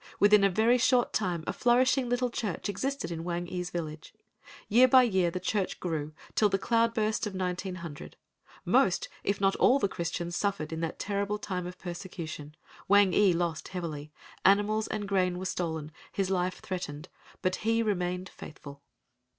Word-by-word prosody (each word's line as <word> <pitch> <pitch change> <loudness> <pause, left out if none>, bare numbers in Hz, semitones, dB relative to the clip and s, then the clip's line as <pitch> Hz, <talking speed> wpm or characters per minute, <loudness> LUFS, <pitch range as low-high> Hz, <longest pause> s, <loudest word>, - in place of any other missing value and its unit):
Within 205 0 +6
a 195 - +5
very 225 +6 +3
short 250 0 +3
time 180 -6 -1
a - - -2
flourishing 250 +1 +3
little 245 0 0
church 215 -6 -3
existed 270 +3 -3
in 165 -1 -4
Wang 175 0 -3
ee's 180 0 -4
village. 155 -3 -6 0.5
Year 245 +5 +6
by 255 0 +7
year 190 -7 +2
the 185 - -4
church 195 +1 -1
grew 155 -3 -3 0.2
till 210 - +3
the 195 - +1
cloudburst 230 0 +1
of 200 - -6
1900. 180 -4 -5 0.5
Most, - - +2
if 200 - 0
not 195 0 +2
all 260 - +5
the 235 - +1
Christians 175 -1 -4
suffered 195 -7 -1
in 160 - -3
that 165 0 -3
terrible 200 0 -2
time 180 -3 -4
of 180 0 -8
persecution,—Wang 175 +2 -1
ee 200 -3 +5
lost 170 -2 -1
heavily,—animals 185 +6 -1
and 210 -2 -3
grain 185 -2 +1
were 185 - -5
stolen, 160 -4 -3 0.2
his 195 -1 -1
life 180 -1 -1
threatened, 170 -4 -5 0.4
but 185 0 +1
he 225 +1 +1
remained 180 -3 -1
faithful. 140 -5 -11
185 Hz, 160 wpm, -29 LUFS, 170-210 Hz, 0.5 s, by